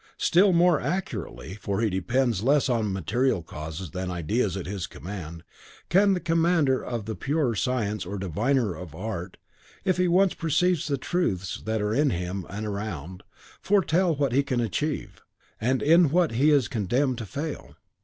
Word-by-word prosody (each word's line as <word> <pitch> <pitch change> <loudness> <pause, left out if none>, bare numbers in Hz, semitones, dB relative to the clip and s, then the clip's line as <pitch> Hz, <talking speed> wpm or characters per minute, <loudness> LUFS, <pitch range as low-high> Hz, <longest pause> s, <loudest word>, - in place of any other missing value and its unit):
Still 190 +3 +4
more 175 -2 +4
accurately, 110 - -4
for 100 0 -2
he 115 - +2
depends 115 +4 0
less 140 +3 +3
on 110 -4 +1
material 95 - 0
causes 80 +2 -7
than 95 0 -4
ideas 90 +3 -1
at 95 - -5
his 95 -2 -4
command, 85 0 -8 0.5
can 195 +2 +4
the - - -1
commander 165 -5 +2
of 115 -4 -4
the 110 - -3
purer 140 0 0
science 105 -3 -1
or 100 +4 -5
diviner 105 - 0 0.2
art, 95 -1 -5 0.5
if 185 -2 +2
he 180 0 +2
once 185 +2 +4
perceive 165 +1 +1
the 140 -2 0
truths 125 - -2
that 110 -1 -1
are 105 +1 0
in 145 +4 +3
him 90 -2 -3
and 105 +3 -5
around, 95 -5 -5 0.4
foretell 185 -3 +2
what 140 -2 0
he 135 +3 +3
can 135 -3 -1
achieve, 140 +7 -2 0.4
and 130 +3 +1
in 165 +1 +6
what 170 +2 +2
he 130 +7 +3
is 140 -6 +4
condemned 125 +4 0
to 110 - -6
fail. 140 - -6
120 Hz, 165 wpm, -26 LUFS, 95-155 Hz, 0.5 s, in